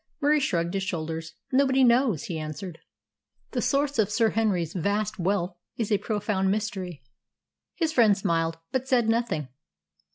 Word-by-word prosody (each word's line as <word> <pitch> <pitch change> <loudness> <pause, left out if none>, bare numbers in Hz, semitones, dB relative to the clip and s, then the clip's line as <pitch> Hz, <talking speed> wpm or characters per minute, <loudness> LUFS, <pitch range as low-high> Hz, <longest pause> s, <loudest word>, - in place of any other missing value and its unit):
Murie 300 +1 +3
shrugged 170 -9 0
his 195 - 0
shoulders. 165 -3 -4 0.2
"Nobody 265 0 +4
knows," 235 - +3
he 165 -3 -4
answered. 155 +3 -6 0.7
"The - - -1
source 280 -2 +1
of 210 -2 +3
Sir 220 0 +2
Henry's 195 -7 0
vast 205 +3 -1
wealth 180 0 0 0.2
is 225 -2 -2
a 205 - +3
profound 205 -3 -1
mystery." 190 - -3 0.7
His 320 -3 0
friend 220 -7 +5
smiled, 165 -3 0
but 260 0 -1
said 245 -4 +3
nothing. 225 - 0
205 Hz, 150 wpm, -26 LUFS, 170-235 Hz, 0.7 s, friend